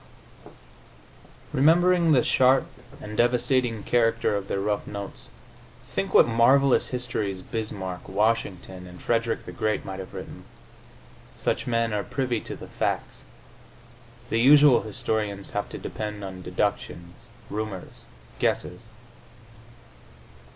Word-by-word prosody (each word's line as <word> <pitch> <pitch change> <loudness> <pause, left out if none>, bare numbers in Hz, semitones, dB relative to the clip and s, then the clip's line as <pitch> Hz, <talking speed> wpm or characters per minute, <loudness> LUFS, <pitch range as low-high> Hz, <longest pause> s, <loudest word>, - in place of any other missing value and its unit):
Remembering 170 +4 +4
the 130 -5 +5
sharp 130 +1 +4 0.3
and 105 -5 -8
devastating 120 -1 +1
character 115 -2 +2
of 100 -1 -3
their 100 - -1
rough 105 +1 -1
notes, 100 -1 -6 0.6
think - - -3
what - - +6
marvelous 130 +4 +4
histories 110 -7 -3
Bismarck, 95 -5 -5
Washington 95 -3 -1
and 90 0 -12
Frederick 115 -1 -1
the - - -7
Great 110 0 -1
might 95 0 -6
have 95 - -8
written! - - -8 0.9
Such - - -1
men 115 -2 +1
are 105 -1 -1
privy 125 -4 -2
to - - -7
the - - -10
facts; - - -3 1.1
the 115 - +2
usual 145 +1 +7
historians 105 -2 -3
have 105 - -3
to - - -7
depend 105 -1 -5
on 95 -1 -7
deductions, 90 +4 -3 0.2
rumors, 105 -3 -5 0.4
guesses. 110 +6 -1
110 Hz, 115 wpm, -26 LUFS, 100-125 Hz, 1.1 s, usual